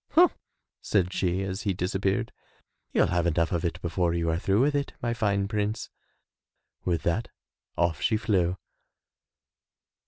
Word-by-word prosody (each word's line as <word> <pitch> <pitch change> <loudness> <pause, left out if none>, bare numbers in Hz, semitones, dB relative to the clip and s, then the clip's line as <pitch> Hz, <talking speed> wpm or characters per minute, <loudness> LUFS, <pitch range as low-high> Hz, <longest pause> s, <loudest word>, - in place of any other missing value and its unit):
"Humph," 350 +2 +6 0.5
said 90 -3 +1
she 90 +1 0
as 95 +1 -3
he 100 - 0
disappeared, 95 +5 0 0.6
"you'll - - +3
have 85 0 +2
enough 85 0 +1
of 85 -3 0
it 85 - -2
before 85 0 0
you 85 -1 +1
are 80 - 0
through 95 +3 +2
with 145 +2 +3
it, 140 -1 -1
my 120 -1 -1
fine 100 -4 +1
prince." 105 +1 -2 0.9
With 85 -3 0
that 85 +7 0 0.5
off 85 -3 +1
she 110 - +2
flew. 95 -5 +1
95 Hz, 150 wpm, -27 LUFS, 85-105 Hz, 0.9 s, Humph